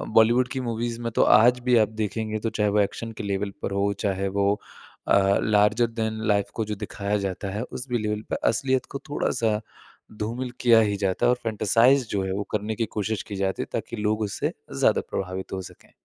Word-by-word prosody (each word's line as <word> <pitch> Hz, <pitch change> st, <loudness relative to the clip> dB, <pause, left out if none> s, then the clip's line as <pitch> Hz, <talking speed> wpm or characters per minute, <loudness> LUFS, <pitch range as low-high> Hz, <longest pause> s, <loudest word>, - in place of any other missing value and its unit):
बॉलीवुड 120 Hz, +3 st, +5 dB
की 130 Hz, -, -3 dB
मूवीज़ 115 Hz, -1 st, -3 dB
में 115 Hz, -, -3 dB
तो -, -, +4 dB
आज 120 Hz, +4 st, +5 dB
भी 125 Hz, -, +4 dB
आप 110 Hz, -2 st, +4 dB
देखेंगे 110 Hz, +1 st, -2 dB
तो 115 Hz, -, -1 dB
चाहे 105 Hz, -1 st, 0 dB
वो 105 Hz, -, +2 dB
एक्शन 115 Hz, +3 st, -1 dB
के -, -, -5 dB
लेवल 100 Hz, 0 st, -2 dB
पर -, -, -2 dB
हो 100 Hz, +1 st, +1 dB
चाहे 100 Hz, -2 st, -1 dB
वो 100 Hz, +1 st, +3 dB, 0.5 s
अ, 100 Hz, 0 st, +4 dB
लार्जर 105 Hz, +3 st, +3 dB
दैन 110 Hz, -1 st, -3 dB
लाइफ़ 100 Hz, -2 st, +1 dB
को 110 Hz, -, -1 dB
जो 105 Hz, -, -3 dB
दिखाया 100 Hz, +1 st, -2 dB
जाता 95 Hz, +1 st, -5 dB
है 105 Hz, +3 st, -3 dB
उस 125 Hz, +1 st, -7 dB
भी 120 Hz, -, +1 dB
लेवल 105 Hz, 0 st, -2 dB
पर -, -, +1 dB
असलियत 130 Hz, +3 st, 0 dB
को 140 Hz, -, -4 dB
थोड़ा-सा 115 Hz, -6 st, 0 dB, 0.6 s
धूमिल 120 Hz, +4 st, -3 dB
किया 120 Hz, -2 st, +6 dB
ही 105 Hz, -2 st, +1 dB
जाता 95 Hz, -2 st, 0 dB
है। -, -, +5 dB
और -, -, +3 dB
फ़ैंटसाइज़ 115 Hz, +4 st, +3 dB
जो 100 Hz, -1 st, 0 dB
है 95 Hz, -, -2 dB
वो 100 Hz, +1 st, -2 dB
करने 105 Hz, +1 st, -2 dB
की 115 Hz, +1 st, 0 dB
कोशिश 105 Hz, 0 st, -1 dB
की 105 Hz, -, -5 dB
जाती 95 Hz, -1 st, -1 dB
है -, -, -9 dB
ताकि 120 Hz, -, -3 dB
लोग 105 Hz, +1 st, 0 dB
उससे 100 Hz, -2 st, -2 dB, 0.3 s
ज़्यादा -, -, +4 dB
प्रभावित 95 Hz, 0 st, -4 dB
हो 95 Hz, -, -3 dB
सकें। 90 Hz, -, -14 dB
105 Hz, 215 wpm, -25 LUFS, 100-115 Hz, 0.6 s, किया